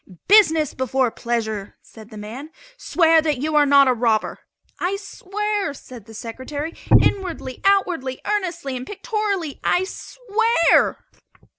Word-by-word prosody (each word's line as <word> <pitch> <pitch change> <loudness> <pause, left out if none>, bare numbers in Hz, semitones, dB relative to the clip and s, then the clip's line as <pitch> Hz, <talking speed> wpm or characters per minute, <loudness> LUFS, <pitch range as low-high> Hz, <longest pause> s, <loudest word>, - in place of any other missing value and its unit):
"Business 325 -8 +5
before 260 -1 0
pleasure," 220 -4 -4
said 220 -1 -15
the 215 - -11
man; 230 +9 -8 0.3
"swear 330 -8 +3
that 305 -3 0
you 305 +4 -2
are 295 -1 +5
not 280 -1 +6
a 255 - +4
robber." 225 -2 0 0.4
"I 370 +3 -1
swear," 395 -2 -3
said 245 -5 -12
the 225 - -12
Secretary; 270 +8 -6 0.3
"inwardly, 345 -9 -2
outwardly, 360 -10 +1
earnestly 365 -10 -2
and 255 0 -6
pictorially, 405 - -3
I 355 - +2
swear!" 450 -2 +1
310 Hz, 130 wpm, -21 LUFS, 255-390 Hz, 0.4 s, not